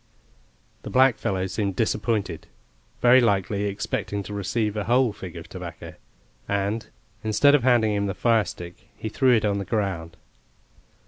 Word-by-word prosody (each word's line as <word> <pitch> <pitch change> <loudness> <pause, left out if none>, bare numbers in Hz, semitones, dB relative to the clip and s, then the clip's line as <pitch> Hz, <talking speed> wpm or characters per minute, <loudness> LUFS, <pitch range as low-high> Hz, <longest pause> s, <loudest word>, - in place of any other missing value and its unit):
The - - -8
blackfellow 120 -8 +2
seemed 95 +1 -2
disappointed; 105 -4 -1 0.6
very 125 +1 +7
likely 100 -2 +1
expecting 100 0 -3
to 105 - -8
receive 105 +1 -1
a 105 - -2
whole 125 -1 +3
fig 90 -3 -9
of 85 - -8
tobacco - - -8 0.6
and, 100 +3 -1 0.4
instead 110 +7 +4
of 145 - +5
handing 120 -4 +3
him 100 0 0
the 95 - -3
firestick 105 -7 -1
he 110 - -4
threw 130 +2 +3
it 110 - +1
on 100 -1 0
the - - -3
ground. 90 -7 -2
105 Hz, 145 wpm, -24 LUFS, 100-115 Hz, 0.6 s, very